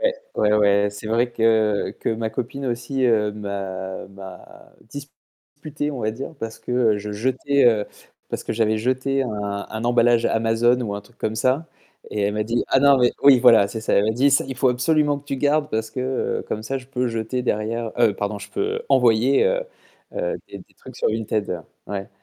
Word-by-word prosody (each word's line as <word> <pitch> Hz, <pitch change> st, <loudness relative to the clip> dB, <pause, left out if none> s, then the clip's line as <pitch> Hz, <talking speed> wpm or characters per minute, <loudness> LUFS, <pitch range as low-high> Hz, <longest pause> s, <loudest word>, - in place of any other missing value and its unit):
Ouais, -, -, +2 dB, 0.2 s
ouais, 105 Hz, -, +2 dB
ouais, 100 Hz, -1 st, +3 dB
c'est 105 Hz, +1 st, -9 dB
vrai 120 Hz, +2 st, +1 dB
que 110 Hz, -3 st, +2 dB
que -, -, -2 dB
ma 110 Hz, 0 st, -3 dB
copine 135 Hz, +4 st, -4 dB
aussi, 120 Hz, +2 st, -2 dB
heu, 110 Hz, -3 st, +3 dB
m'a 95 Hz, -2 st, -5 dB
m'a 95 Hz, -1 st, -13 dB, 0.2 s
disputé 145 Hz, +2 st, -8 dB
on 135 Hz, -4 st, -5 dB
va 110 Hz, -1 st, 0 dB
dire, 135 Hz, +8 st, -7 dB
parce 115 Hz, 0 st, -5 dB
que 120 Hz, -4 st, +1 dB
je 105 Hz, +1 st, -6 dB
jetais, 130 Hz, +5 st, +1 dB
heu 110 Hz, -3 st, +3 dB, 0.4 s
parce -, -, -4 dB
que -, -, -3 dB
j'avais 110 Hz, -1 st, +1 dB
jeté 130 Hz, +3 st, 0 dB
un 105 Hz, -4 st, -4 dB
un 110 Hz, +1 st, -5 dB
emballage 120 Hz, -1 st, +3 dB
Amazon 115 Hz, +2 st, +2 dB
ou 105 Hz, -4 st, -3 dB
un 100 Hz, -, -5 dB
truc 120 Hz, +4 st, -24 dB
comme 110 Hz, -, -2 dB
ça, 130 Hz, +8 st, 0 dB, 0.4 s
et 105 Hz, -, -2 dB
elle 100 Hz, +1 st, +1 dB
m'a 105 Hz, -, 0 dB
dit: 115 Hz, +2 st, -1 dB
«Ah 135 Hz, -, +3 dB
non 140 Hz, -1 st, +6 dB
mais» 125 Hz, -1 st, +3 dB
Oui, 140 Hz, -2 st, +8 dB
voilà, 115 Hz, -5 st, +6 dB
c'est 110 Hz, -, -5 dB
ça. 110 Hz, -, -2 dB
Elle 100 Hz, -, +4 dB
m'a 110 Hz, -, +2 dB
dit: 135 Hz, +5 st, +3 dB
«Ca, 135 Hz, -, +3 dB
il 135 Hz, -, -5 dB
faut 130 Hz, +1 st, +3 dB
absolument 145 Hz, +3 st, +1 dB
que 140 Hz, -, -18 dB
tu 140 Hz, -, -2 dB
le -, -, -5 dB
gardes 145 Hz, +2 st, +1 dB
parce 110 Hz, 0 st, -2 dB
que, 130 Hz, -, -5 dB, 0.4 s
heu, -, -, -11 dB
comme 110 Hz, -, -3 dB
ça 135 Hz, +5 st, -3 dB
je 125 Hz, -, -14 dB
peux 125 Hz, -1 st, -2 dB
jeter 115 Hz, +2 st, -2 dB
derrière» 115 Hz, 0 st, -2 dB
heu, 105 Hz, -, +4 dB
pardon: 100 Hz, +1 st, -3 dB
«je -, -, -11 dB
peux 425 Hz, +4 st, -2 dB
envoyer, 125 Hz, +2 st, +4 dB
heu, -, -, +1 dB, 0.5 s
heu, -, -, -2 dB
des -, -, -8 dB
des -, -, -18 dB
trucs -, -, -13 dB
sur -, -, +1 dB
Vinted». 110 Hz, -5 st, -2 dB, 0.2 s
Ouais. 100 Hz, -1 st, -5 dB
115 Hz, 215 wpm, -22 LUFS, 105-135 Hz, 0.5 s, Oui